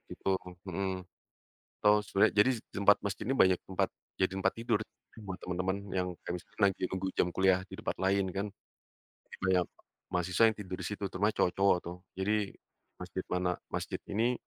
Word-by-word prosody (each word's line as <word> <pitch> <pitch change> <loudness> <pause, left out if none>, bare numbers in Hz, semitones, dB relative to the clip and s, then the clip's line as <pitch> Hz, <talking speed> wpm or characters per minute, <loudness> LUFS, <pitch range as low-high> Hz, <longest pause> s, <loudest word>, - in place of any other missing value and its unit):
gitu, 95 - -2 0.4
mhm. 95 +1 -1 0.9
Atau 105 0 +6
sebenarnya 100 - +4
jadi 120 - +6 0.2
tempat 100 +1 +5
masjid 100 -2 -2
ini 135 - +1
banyak 95 -7 +5
tempat 95 - 0 0.2
jadi 95 -1 +1
tempat 95 0 +2
tidur 115 -2 +1 0.5
buat 95 -1 -4
teman-teman 90 +1 -1
yang 90 -1 0
kayak 90 - -3
misalnya 90 - -16
lagi 95 - -9
nunggu 95 0 -2
jam 90 - +4
kuliah 95 -1 +4
di - - -9
tempat - - -2
lain, 95 +1 +3
kan, 100 +2 -1 1.0
banyak 95 -2 +3 0.5
mahasiswa 90 +5 +4
yang 110 - -5
tidur 95 -3 -5
di - - -4
situ, 105 -1 -3
terutama 100 +3 +2
cowok-cowok, 95 -2 +3
tuh. 90 +1 -5 0.2
Jadi, 105 +1 +1 0.5
masjid - - -5
mana 90 0 +1 0.2
masjid - - -3
ini, 115 +5 +2
95 Hz, 165 wpm, -32 LUFS, 90-100 Hz, 1.0 s, Atau